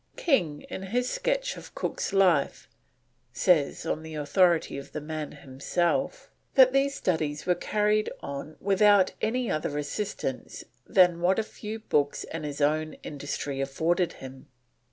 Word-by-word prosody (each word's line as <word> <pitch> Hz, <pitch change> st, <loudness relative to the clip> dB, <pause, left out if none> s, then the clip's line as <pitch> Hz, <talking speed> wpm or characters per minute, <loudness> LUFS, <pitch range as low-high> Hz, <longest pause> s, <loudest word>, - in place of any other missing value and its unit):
King 170 Hz, -, +1 dB
in -, -, -7 dB
his 240 Hz, +6 st, -1 dB
sketch -, -, -1 dB
of -, -, -12 dB
Cook's -, -, -3 dB
life, 185 Hz, -7 st, +2 dB, 0.7 s
says, 155 Hz, -2 st, +2 dB
on 155 Hz, -, -2 dB
the 160 Hz, 0 st, -8 dB
authority 165 Hz, +3 st, +2 dB
of 140 Hz, -, -12 dB
the -, -, -3 dB
man 155 Hz, 0 st, -5 dB
himself, 150 Hz, -, -2 dB, 0.2 s
that 260 Hz, -1 st, +7 dB
these 275 Hz, 0 st, +2 dB
studies 155 Hz, -4 st, -1 dB
were 180 Hz, -, +3 dB
carried 210 Hz, +3 st, +1 dB
on 140 Hz, +2 st, -7 dB
"without 200 Hz, -1 st, +4 dB
any 240 Hz, +2 st, 0 dB
other 150 Hz, -1 st, -2 dB
assistance 145 Hz, -2 st, -4 dB, 0.2 s
than 180 Hz, -3 st, +4 dB
what 185 Hz, +2 st, +3 dB
a 220 Hz, -, +1 dB
few 215 Hz, 0 st, -7 dB
books 145 Hz, -10 st, 0 dB
and 160 Hz, -1 st, -6 dB
his 145 Hz, 0 st, -5 dB
own 155 Hz, +2 st, +1 dB
industry 145 Hz, -1 st, -4 dB
afforded 165 Hz, +6 st, 0 dB
him." 130 Hz, 0 st, -11 dB
170 Hz, 145 wpm, -27 LUFS, 145-210 Hz, 0.7 s, that